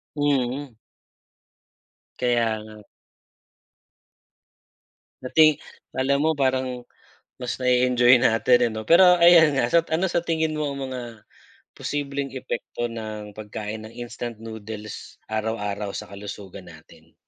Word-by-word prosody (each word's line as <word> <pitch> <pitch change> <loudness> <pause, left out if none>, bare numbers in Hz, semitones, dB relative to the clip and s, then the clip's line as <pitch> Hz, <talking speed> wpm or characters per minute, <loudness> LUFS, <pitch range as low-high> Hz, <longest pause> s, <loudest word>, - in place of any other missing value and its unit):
Mm. 140 -2 -1 1.4
Kaya 115 -3 +1
nga. 110 -1 -13 2.4
Dati 155 +4 +5 0.4
'kala 130 +2 +1
mo 160 - +3
parang 130 -3 -1 0.6
mas 125 - -3
na-e-enjoy 125 -1 +4
natin, 120 +2 +4
eh, - - -8
'no. 110 0 -6
Pero 180 +1 +7
ayan 165 -4 +7
nga, 135 - +2
sa 170 - +6
ano 165 +4 +1
sa 175 -1 0
tingin 160 -2 0
mo 150 -1 -1
ang 140 0 -5
mga 125 - -4 0.8
posibleng 140 -1 -3
epekto 120 -2 -4
ng 110 -2 -7
pagkain 110 0 -6
ng 110 - -11
instant 120 -1 -7
noodles 110 -1 -9
araw-araw 105 -2 -3
sa - - -7
kalusugan 100 -1 -9
natin? 80 0 -19
120 Hz, 115 wpm, -24 LUFS, 110-140 Hz, 2.4 s, Pero